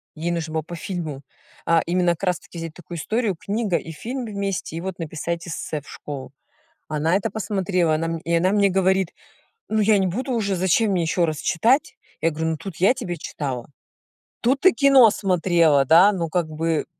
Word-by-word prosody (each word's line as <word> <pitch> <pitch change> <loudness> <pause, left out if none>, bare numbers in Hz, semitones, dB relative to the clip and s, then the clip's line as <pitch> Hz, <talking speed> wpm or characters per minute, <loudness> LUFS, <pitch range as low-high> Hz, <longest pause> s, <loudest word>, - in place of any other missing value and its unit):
ей 170 +2 -2
нужно 165 -2 -3
было 160 - 0
по 170 +3 -8
фильму, 160 -5 -5 0.4
а, 165 -1 +4
именно 175 0 +2
как 170 +3 -5
раз 180 -2 +1
таки 165 +1 -13
взять 165 -1 -6
такую 175 0 -9
историю, 215 +3 -1
книга 205 -1 -1
и 165 - -7
фильм 245 - -5
вместе, 200 -6 -3
и 165 - -4
вот 190 -1 -5
написать 170 +2 -4
эссе 155 -2 -4
в - - -22
школу. 140 -2 -8 0.6
Она 155 +3 0
это 195 - 0
посмотрела, 185 -6 0
она 165 +1 -1
мн 165 - -2
и 170 +1 -3
она 180 +3 +3
мне 200 -1 +3
говорит: 190 -1 +2 0.6
"Ну, 220 0 +1
я 210 -1 +4
не 190 - +1
буду 255 +8 -3
уже, 200 -5 0
зачем 190 +4 +2
мне 180 -2 +1
ещё 170 +1 +1
раз 155 -2 -3
читать?" 235 - +1 0.2
Я 165 - +2
говорю: 160 +1 -2
"Ну, 160 - -2
тут 190 0 -8
я 195 +8 +4
тебе 190 -10 -5
читала, 130 -7 -5 0.7
тут 260 +3 +2
ты 375 - +6
кино 270 -5 +6
смотрела, 170 -7 +3
да, 175 +8 +6
ну 170 -4 -2
как 170 -1 -1
бы". 160 0 -1
175 Hz, 200 wpm, -23 LUFS, 160-200 Hz, 0.7 s, ты